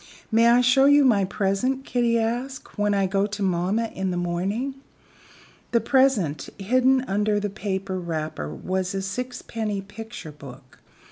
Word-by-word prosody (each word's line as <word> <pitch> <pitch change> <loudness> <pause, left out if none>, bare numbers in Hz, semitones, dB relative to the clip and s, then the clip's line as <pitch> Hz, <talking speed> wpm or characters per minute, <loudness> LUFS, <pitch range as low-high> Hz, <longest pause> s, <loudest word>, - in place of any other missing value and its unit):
"May 230 +1 +5
I 240 +1 +6
show 270 +2 +5 0.2
my 215 -7 +4
present," 210 +7 -1
Kitty 240 -2 +1
asked, 245 +4 -3
"when 205 -1 +1
I 195 -1 +2
go 195 +2 +1
to 205 0 -4
mamma 190 +5 0
in 190 0 -2
the 180 - -2
morning?" 190 +10 -2 1.0
The 235 - +5
present 250 - +2
hidden 255 +6 +3
under 205 +1 +1
the 205 -1 -3
paper 195 -2 -3
wrapper 155 - -4
was 185 - -3
a 195 - -2
sixpenny 220 -1 -4
picture 210 -4 -9
book. 135 -3 -13
205 Hz, 145 wpm, -24 LUFS, 185-235 Hz, 1.0 s, I